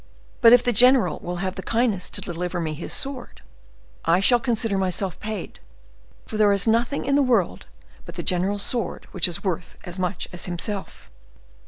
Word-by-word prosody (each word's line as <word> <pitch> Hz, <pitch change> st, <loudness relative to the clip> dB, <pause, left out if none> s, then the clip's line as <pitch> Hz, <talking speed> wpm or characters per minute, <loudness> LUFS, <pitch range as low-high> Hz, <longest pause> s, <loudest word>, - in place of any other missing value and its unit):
But 230 Hz, -, +8 dB
if 245 Hz, 0 st, +7 dB
the 245 Hz, -, +2 dB
general 245 Hz, -, +5 dB
will 175 Hz, +1 st, -5 dB
have 185 Hz, -, -2 dB
the 190 Hz, -, -6 dB
kindness 225 Hz, -2 st, 0 dB
to -, -, -4 dB
deliver 175 Hz, +1 st, -4 dB
me 160 Hz, -2 st, -2 dB
his 155 Hz, -, -5 dB
sword, 270 Hz, -2 st, -3 dB, 0.6 s
I 170 Hz, +2 st, +3 dB
shall 240 Hz, +5 st, +4 dB
consider 225 Hz, -3 st, -1 dB
myself 185 Hz, -1 st, -2 dB
paid; 215 Hz, 0 st, -6 dB, 0.7 s
for 215 Hz, -, -6 dB
there 210 Hz, -1 st, +5 dB
is 200 Hz, -1 st, +2 dB
nothing 235 Hz, +5 st, +1 dB
in 275 Hz, -, +1 dB
the 285 Hz, -, +4 dB
world 235 Hz, -9 st, +1 dB, 0.4 s
but -, -, -10 dB
the -, -, -4 dB
general's 195 Hz, +3 st, 0 dB
sword 240 Hz, -3 st, -3 dB
which -, -, +3 dB
is 175 Hz, -, -3 dB
worth 180 Hz, -3 st, -3 dB
as 180 Hz, 0 st, -7 dB
much 185 Hz, 0 st, -2 dB
as 175 Hz, -, -4 dB
himself." 190 Hz, +3 st, -5 dB
200 Hz, 185 wpm, -23 LUFS, 180-235 Hz, 0.7 s, But